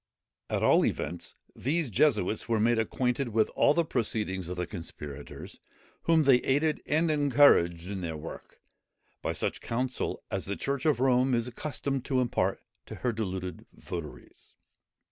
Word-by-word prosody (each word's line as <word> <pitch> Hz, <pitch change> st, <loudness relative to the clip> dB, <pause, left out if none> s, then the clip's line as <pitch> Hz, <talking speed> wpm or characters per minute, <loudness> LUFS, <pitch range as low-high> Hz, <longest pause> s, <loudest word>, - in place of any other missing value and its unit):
At -, -, -1 dB
all -, -, +5 dB
events 85 Hz, +3 st, -2 dB, 0.2 s
these 150 Hz, -1 st, -1 dB
Jesuits 110 Hz, -4 st, +2 dB
were 115 Hz, -2 st, +2 dB
made 115 Hz, +1 st, +3 dB
acquainted 125 Hz, +3 st, 0 dB
with 110 Hz, -1 st, +2 dB
all 145 Hz, -, +3 dB
the 170 Hz, -, +2 dB
proceedings 105 Hz, -, -1 dB
of 90 Hz, -, -5 dB
the 90 Hz, -, -1 dB
conspirators, 75 Hz, -6 st, -8 dB, 0.5 s
whom 165 Hz, -1 st, +4 dB
they 135 Hz, -3 st, +6 dB
aided 145 Hz, +5 st, +1 dB
and 160 Hz, +2 st, +2 dB
encouraged 130 Hz, -, +4 dB
in 100 Hz, -1 st, -4 dB
their 80 Hz, -3 st, -4 dB
work, 80 Hz, +2 st, -10 dB, 0.6 s
by -, -, -1 dB
such -, -, -2 dB
counsel 125 Hz, +2 st, -2 dB
as -, -, -2 dB
the 100 Hz, -, -2 dB
church 140 Hz, +5 st, -2 dB
of 150 Hz, -5 st, +3 dB
Rome 130 Hz, 0 st, +3 dB
is 115 Hz, 0 st, 0 dB
accustomed 135 Hz, +1 st, -3 dB
to 130 Hz, -2 st, +1 dB
impart 125 Hz, -2 st, 0 dB, 0.3 s
to -, -, -7 dB
her 125 Hz, -, -1 dB
deluded 95 Hz, -5 st, -4 dB
votaries. 75 Hz, -8 st, -9 dB
120 Hz, 155 wpm, -29 LUFS, 95-140 Hz, 0.6 s, they